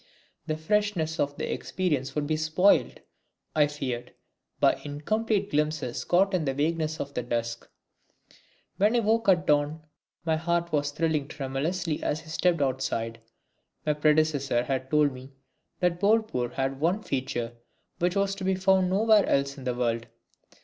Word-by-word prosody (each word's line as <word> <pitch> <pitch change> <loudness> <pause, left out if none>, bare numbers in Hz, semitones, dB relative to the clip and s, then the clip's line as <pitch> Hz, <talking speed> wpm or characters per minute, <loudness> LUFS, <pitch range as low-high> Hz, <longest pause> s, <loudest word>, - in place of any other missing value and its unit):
The 155 - -1
freshness 170 -2 0
of 145 0 0
the - - -2
experience 145 -8 -2
would 150 -1 0
be 155 +1 0
spoilt, 155 +5 +2 0.5
I 150 -1 +5
feared, 130 -5 -5 0.4
by - - +3
incomplete 200 +8 -1
glimpses 150 -4 -1
caught 190 +3 +3
in 175 -4 +1
the 135 -1 -1
vagueness 155 +1 -1
of 140 - -5
the - - -1
dusk. 115 -1 -3 1.1
When 210 +4 +3
I 240 - +3
woke 225 0 +2
at 180 -4 +4
dawn 150 +2 +1 0.4
my 160 -1 +2
heart 170 +1 -1
was 145 -1 +1
thrilling 155 -1 -1
tremulously 150 +5 -2
as 155 +2 -2
I 155 - -14
stepped 170 -1 +2
outside. 115 -4 -2 0.6
My 150 - +2
predecessor 150 -4 +2
had 130 0 -2
told 150 -1 +3
me 130 +2 -11 0.5
that 175 -1 +1
Bolpur 205 - +1
had 135 0 -2
one 180 +8 +1
feature 125 -3 -3 0.5
which 175 +2 +1
was 200 0 +1
to 195 -1 -7
be 190 0 +2
found 190 -1 +3
nowhere 210 +2 +4
else 140 0 +1
in 135 -2 -10
the 125 -1 -1
world. 115 -2 -1
155 Hz, 155 wpm, -27 LUFS, 135-180 Hz, 1.1 s, I